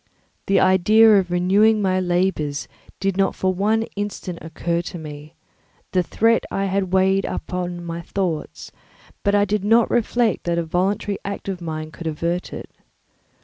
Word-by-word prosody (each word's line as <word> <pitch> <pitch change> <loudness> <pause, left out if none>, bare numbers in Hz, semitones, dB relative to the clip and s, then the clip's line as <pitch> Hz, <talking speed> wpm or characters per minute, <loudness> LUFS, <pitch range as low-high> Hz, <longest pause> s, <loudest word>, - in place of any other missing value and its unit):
The 195 - +4
idea 210 +3 +5
of 185 -2 -3
renewing 195 +5 +3
my 185 -2 +1
labours 175 -5 -1 0.3
did 195 -1 -1
not 195 -1 +1
for 185 0 0
one 215 +4 +1
instant 200 -4 -4
occur 170 +1 -2
to 175 +1 -7
me; 150 0 -9 0.6
the 185 - +2
threat 225 +6 +2
I 195 - -1
had 195 0 0
heard 185 - -10
weighed 190 +1 +3
on 175 -1 -4
my 170 0 -5
thoughts, 170 -3 -4 0.5
but 200 -1 +2
I 205 0 +4
did 205 0 -1
not 225 +3 +4
reflect 235 -2 +1
that 170 0 0
a 170 - +1
voluntary 190 +4 -1
act 200 0 -5
of 185 -2 -4
mine 155 -1 -5
could 165 +1 -7
avert 170 +3 -2
it. - - -8
185 Hz, 165 wpm, -22 LUFS, 170-200 Hz, 0.6 s, idea